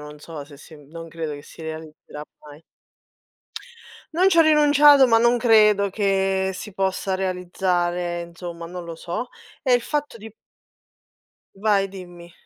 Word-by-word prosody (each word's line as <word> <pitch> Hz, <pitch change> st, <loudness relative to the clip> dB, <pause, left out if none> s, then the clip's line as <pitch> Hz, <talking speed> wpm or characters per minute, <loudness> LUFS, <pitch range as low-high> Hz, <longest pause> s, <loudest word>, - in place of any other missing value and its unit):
non 150 Hz, 0 st, -11 dB
so 150 Hz, -1 st, -9 dB
se 145 Hz, 0 st, -15 dB
si 155 Hz, -, -15 dB
m 145 Hz, -2 st, -17 dB
non 165 Hz, 0 st, -9 dB
credo 160 Hz, -2 st, -5 dB
che 145 Hz, -, -11 dB
si 160 Hz, -, -14 dB
realizzerà 155 Hz, -1 st, -9 dB, 0.2 s
mai. 150 Hz, 0 st, -14 dB, 1.5 s
Non 365 Hz, +4 st, +3 dB
ci 335 Hz, -, +2 dB
ho -, -, +9 dB
rinunciato, 295 Hz, -3 st, +6 dB
ma 225 Hz, -1 st, +5 dB
non 240 Hz, +1 st, +3 dB
credo 210 Hz, -4 st, +4 dB
che 195 Hz, -1 st, 0 dB
si 210 Hz, +2 st, -8 dB
possa 190 Hz, 0 st, -2 dB
realizzare, 180 Hz, -2 st, -2 dB
insomma, 170 Hz, 0 st, -9 dB
non 175 Hz, 0 st, -8 dB
lo 170 Hz, -, -7 dB
so, 175 Hz, +9 st, -5 dB, 0.3 s
è 255 Hz, -, +1 dB
il 245 Hz, -, +4 dB
fatto 295 Hz, -2 st, -3 dB
di 220 Hz, 0 st, -12 dB, 1.2 s
Vai, 200 Hz, -1 st, +1 dB
dimmi. 175 Hz, -3 st, -12 dB
185 Hz, 155 wpm, -22 LUFS, 170-220 Hz, 1.5 s, ho